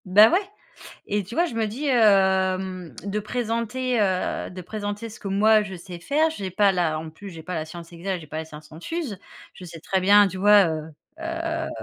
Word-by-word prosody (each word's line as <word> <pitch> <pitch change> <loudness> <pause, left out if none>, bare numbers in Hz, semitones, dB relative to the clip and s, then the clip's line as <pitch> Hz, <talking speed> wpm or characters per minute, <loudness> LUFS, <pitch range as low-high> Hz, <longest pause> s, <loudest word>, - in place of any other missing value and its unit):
Ben, 205 +4 +7
ouais. 360 - +4 0.7
Et 205 0 -1
tu 205 - -9
vois? 345 +3 +2
Je 285 - -7
me 225 -1 0
dis, 245 +8 -4
hem, 190 - +2
de 200 +1 -2
présenter, 235 +2 -1
heu, 185 -3 -1
de 185 - -8
présenter 205 +3 -5
ce 220 - -12
que 200 - -5
moi 215 +2 +4
je 190 -2 -7
sais 175 0 -9
faire. 300 - +2
J'ai 200 -12 -5
pas 200 +2 +3
la 170 -4 0
en 160 +1 -6
plus, 195 +6 -10
j'ai 165 -3 -10
pas 180 +3 -5
la 160 -2 -2
science 170 +1 -10
exacte, 180 +2 -4
j'ai 155 - -12
pas 155 +1 -6
la 160 - -4
science 155 -1 -13
infuse. 225 - -5 0.4
Je 185 - -11
sais 165 -2 -10
très 190 +3 0
bien, 205 +2 +6
tu 190 - -8
vois? 205 0 +6
Heu 160 -1 -2 0.4
heu 330 0 -3
195 Hz, 220 wpm, -24 LUFS, 180-220 Hz, 0.7 s, Ben